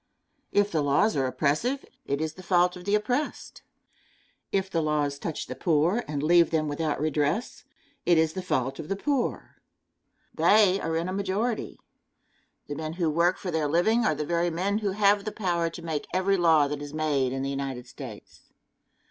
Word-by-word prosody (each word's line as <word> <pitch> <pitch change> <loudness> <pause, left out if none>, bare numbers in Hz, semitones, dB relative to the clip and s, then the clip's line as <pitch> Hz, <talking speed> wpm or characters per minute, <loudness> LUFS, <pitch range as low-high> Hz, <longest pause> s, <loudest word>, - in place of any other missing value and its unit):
If 205 0 +2
the 155 - +1
laws 145 +10 +2
are 135 -2 +1
oppressive, 155 - 0 0.2
it 140 +2 -1
is 160 -1 -2
the 185 - -12
fault 180 0 +2
of 180 0 -10
the 205 - +2
oppressed. 250 +7 -2 0.9
If 195 -1 0
the 170 -4 -1
laws 150 -2 0
touch 160 0 -4
the - - -6
poor 170 +7 +1
and 145 -1 -3
leave 170 +2 +5
them 155 -2 0
without 150 +1 -2
redress, 155 - -1 0.4
it 175 -1 +4
is 160 0 +2
the 190 - -4
fault 135 -6 -1
of 160 - -7
the 195 - 0
poor. 270 +4 -2 0.8
They 200 -3 +4
are 165 0 -1
in 165 +2 -2
a 185 - -3
majority. 200 +4 -2 0.9
The 145 - -5
men 155 +2 -4
who 165 -2 0
work 170 +4 +2
for 180 - -5
their 160 -2 0
living 200 +10 +2
are 155 - +2
the 150 - -3
very 170 +2 +1
men 190 +5 -1
who 205 -3 -1
have 205 0 +3
the 215 - -4
power 175 -5 -1
to 170 - -9
make 160 -3 -3
every 190 +2 +2
law 165 -5 +4
that 145 0 -4
is 145 +1 -7
made 145 -5 +1
in 135 0 -3
the 135 - -2
United 135 -3 -4
States. 125 -4 -11
165 Hz, 190 wpm, -27 LUFS, 150-195 Hz, 0.9 s, leave